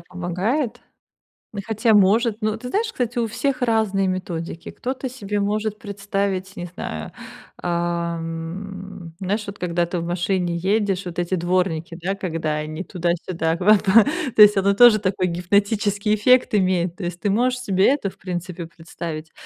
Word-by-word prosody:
помогает. 180 - -2 0.7
Но 205 - -5
хотя 220 +1 +2
может. 210 +3 +4
Ну, 215 0 0
ты 250 +2 -7
знаешь, 445 - 0
кстати, 245 - -3
у 230 - +1
всех 265 +5 -2
разные 220 -5 +1
методики. 170 -3 -4
Кто-то 260 +1 -4
себе 210 -5 -3
может 210 +1 -1
представить, 195 -2 -3
не 175 - -5
знаю, 80 - -6 0.5
ам, 170 +2 -4
знаешь, 205 +3 -2
вот 200 0 -7
когда 175 -1 0
ты 175 0 -3
в 165 - -4
машине 175 0 -1
едешь, 195 +1 0
вот 175 -1 -5
эти 175 +2 0
дворники, 175 -2 -1
да, 190 +3 -1
когда 165 -5 -2
они 155 +3 -4
туда-сюда 170 -2 -1
в - - -14
оба 210 +3 +6 0.6
То - - +6
есть 210 0 +9
оно 195 +1 +3
тоже 220 0 +7
такой 185 -1 0
гипнотический 200 +4 +1
эффект 250 +4 +4
имеет. 185 -3 +1
То 195 - -8
есть 175 0 -4
ты 205 - -1
можешь 250 +5 +1
себе 195 -5 +2
это, 275 -9 -2
в - - -17
принципе, 180 -2 -5
представить, 160 -1 -7
190 Hz, 160 wpm, -22 LUFS, 175-210 Hz, 0.7 s, есть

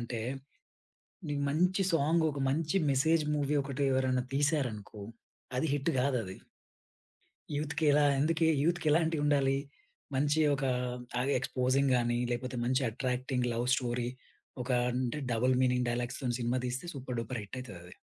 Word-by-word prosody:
జెప్పాలంటే 120 -1 -4 1.1
నీకు 145 -1 -2
మంచి 180 +6 +2
సాంగ్ 165 +1 +2
ఒక 140 - -6
మంచి 155 +4 0
మెసేజ్ 155 +4 +3
మూవీ 145 0 0
ఒకటి 140 +1 -3
ఎవరైనా 130 -1 +1
తీశారనుకో 135 -8 -1 0.6
అది 160 - +1
హిట్ 145 +2 0
గాదది. 125 -8 0 1.2
యూత్‌కెలా 150 0 +2 0.2
ఎందుకే 160 +1 +2 0.2
యూత్‌కేలాంటివి 160 -1 +2
ఉండాలి? 140 -2 +3 0.6
మంచి 145 +3 +2
ఒక 140 0 -3 0.5
తాగి, 125 +3 0
ఎక్‌స్పోజింగ్ 130 +2 +1
గాని, 120 0 +1
లేపోతే 125 +1 -3
మంచి 130 +2 +1
అట్రాక్టింగ్ 125 +1 -1
లవ్ 120 +1 -1
స్టోరీ 120 -1 -1 0.5
ఒక 125 - -6 0.2
అంటే 125 +3 -1
double 125 +3 +2
meaning 125 -1 +2
డైలాగ్స్‌తో 120 +2 -2
cinema 125 +1 0
దీస్తే 125 +6 -3
super 130 -2 -5
duper 115 +1 -3
హిటయితదది. 100 -6 -9
130 Hz, 125 wpm, -31 LUFS, 125-145 Hz, 1.2 s, మెసేజ్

